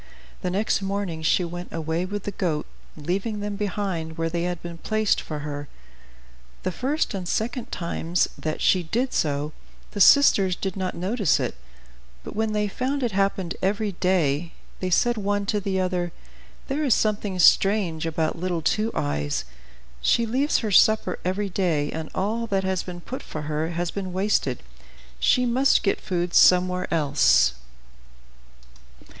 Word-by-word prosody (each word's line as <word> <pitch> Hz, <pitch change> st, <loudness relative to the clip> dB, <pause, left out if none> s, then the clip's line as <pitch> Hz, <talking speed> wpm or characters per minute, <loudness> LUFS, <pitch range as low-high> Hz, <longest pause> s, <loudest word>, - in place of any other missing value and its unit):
The 180 Hz, -, -1 dB
next 200 Hz, +2 st, 0 dB
morning 195 Hz, -4 st, -3 dB
she 165 Hz, +3 st, +2 dB
went 175 Hz, +1 st, -6 dB
away 165 Hz, +2 st, -2 dB
with 205 Hz, +1 st, -5 dB
the 205 Hz, -, -3 dB
goat, 165 Hz, -6 st, -1 dB, 0.3 s
leaving 195 Hz, +8 st, -2 dB
them 205 Hz, 0 st, -3 dB
behind 190 Hz, -5 st, -3 dB
where 165 Hz, 0 st, -1 dB
they 170 Hz, 0 st, -1 dB
had 175 Hz, -1 st, -2 dB
been 170 Hz, -1 st, -7 dB
placed 215 Hz, +1 st, +1 dB
for 150 Hz, -2 st, -6 dB
her. 145 Hz, -1 st, -5 dB, 1.0 s
The -, -, -1 dB
first 270 Hz, -, -1 dB
and 185 Hz, -3 st, -4 dB
second 235 Hz, +5 st, -2 dB
times 170 Hz, 0 st, -1 dB
that 155 Hz, -1 st, -4 dB
she 185 Hz, -, +4 dB
did 235 Hz, +10 st, -1 dB
so, 145 Hz, 0 st, 0 dB, 0.4 s
the 205 Hz, -, -3 dB
sisters 195 Hz, -8 st, +6 dB
did 190 Hz, -1 st, -4 dB
not 185 Hz, -2 st, -3 dB
notice 195 Hz, -, +1 dB
it; -, -, -2 dB, 0.7 s
but -, -, -8 dB
when 220 Hz, 0 st, 0 dB
they 210 Hz, 0 st, +1 dB
found 260 Hz, +6 st, -2 dB
it 240 Hz, -, 0 dB
happened 195 Hz, -2 st, 0 dB
every 205 Hz, +2 st, 0 dB
day, 170 Hz, -4 st, 0 dB, 0.3 s
they 185 Hz, -, -2 dB
said 240 Hz, +6 st, +2 dB
one 205 Hz, 0 st, -1 dB
to 210 Hz, +1 st, 0 dB
the 195 Hz, -1 st, -1 dB
other, 180 Hz, -2 st, -1 dB, 0.6 s
"There 290 Hz, +2 st, -1 dB
is 270 Hz, -6 st, +4 dB
something 205 Hz, -3 st, 0 dB
strange 180 Hz, -3 st, +4 dB
about 160 Hz, +1 st, -1 dB
little 175 Hz, -2 st, -2 dB
Two 215 Hz, +7 st, +1 dB
Eyes, 75 Hz, -2 st, -1 dB, 0.6 s
she 235 Hz, -, +3 dB
leaves 265 Hz, +6 st, +1 dB
her 210 Hz, -, -1 dB
supper 215 Hz, -1 st, +4 dB
every 190 Hz, +3 st, -1 dB
day, 165 Hz, -6 st, 0 dB
and 160 Hz, 0 st, -5 dB
all 225 Hz, +5 st, -1 dB
that 195 Hz, -2 st, 0 dB
has 190 Hz, -1 st, 0 dB
been 175 Hz, -1 st, -8 dB
put 260 Hz, +9 st, -6 dB
for 155 Hz, -, -7 dB
her 155 Hz, +1 st, -2 dB
has 170 Hz, 0 st, -2 dB
been 190 Hz, -2 st, -4 dB
wasted; 185 Hz, -9 st, 0 dB, 0.6 s
she 250 Hz, -, +3 dB
must 255 Hz, +3 st, +3 dB
get 195 Hz, -, 0 dB
food 175 Hz, -1 st, -2 dB
somewhere 180 Hz, 0 st, +4 dB
else." 145 Hz, -, +4 dB
185 Hz, 160 wpm, -24 LUFS, 165-210 Hz, 1.0 s, sisters